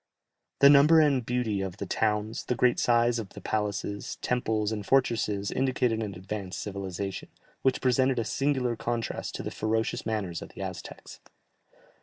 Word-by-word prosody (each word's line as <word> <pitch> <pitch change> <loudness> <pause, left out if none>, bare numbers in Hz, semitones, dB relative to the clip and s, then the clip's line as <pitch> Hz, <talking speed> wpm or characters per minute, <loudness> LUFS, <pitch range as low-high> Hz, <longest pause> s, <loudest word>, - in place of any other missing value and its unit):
The 140 - +9
number 150 +3 +7
and 140 -5 +3
beauty 115 -4 -1
of 95 -1 -4
the - - -4
towns, 110 0 -1
the 125 - 0
great 120 +1 +3
size 120 0 +3
of 105 -4 -6
the - - -9
palaces, 100 -1 -3
temples, 110 -4 0
and 105 -2 -3
fortresses 105 -5 +1
indicated 125 -4 +1
an 100 -4 -4
advanced 95 +1 -5
civilization, 95 -1 -5 0.3
which 130 - +1
presented 130 0 +2
a 115 - 0
singular 130 -3 0
contrast 115 +1 -3
to - - -5
the - - -4
ferocious 110 +1 -1
manners 100 -7 -3
of - - -8
the - - -7
Aztecs. - - -8
110 Hz, 160 wpm, -28 LUFS, 105-125 Hz, 0.3 s, The